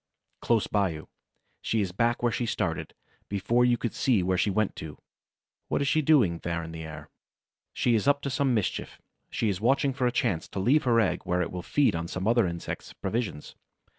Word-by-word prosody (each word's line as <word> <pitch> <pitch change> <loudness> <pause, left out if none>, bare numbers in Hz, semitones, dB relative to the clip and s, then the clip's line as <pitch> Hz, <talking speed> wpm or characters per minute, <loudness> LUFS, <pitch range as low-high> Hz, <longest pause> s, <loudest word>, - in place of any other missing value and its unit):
Close 115 -3 +2
by 100 -2 +1
you. 80 -1 -8 0.5
She 110 - 0
is 95 -3 -2
back 115 +5 0
where 120 - +3
she 120 +1 -2
started, 80 -5 -2 0.3
before 105 +5 +1
you 120 -1 +3
could 120 - -3
see 115 -9 +2
where 95 +1 +1
she 95 +3 +1
went 105 +1 0
to. 75 -1 -7 0.7
What - - 0
is 140 - 0
she 155 +2 +3
doing, 130 - +3
there 85 0 -3
in 80 - -7
the 80 0 -7
air? 75 -1 -9 0.6
She 120 - +1
is 110 +3 +1
up 140 0 +3
to 140 - -2
some 130 -1 +1
mischief; 105 -4 -2 0.3
she 115 - -1
is 100 -2 -1
watching 135 +3 +2
for 130 -1 0
a - - +1
chance 90 -8 0
to - - -5
leave 135 +10 +3
her 120 -2 +4
egg 105 -5 +1
where 90 0 +1
it 85 - -5
will 90 - -4
feed 140 +3 +2
on 85 0 -3
some 95 +3 -3
other 115 -3 +4
insect's 85 0 -6
provisions. 100 -6 -4
105 Hz, 215 wpm, -27 LUFS, 90-120 Hz, 0.7 s, her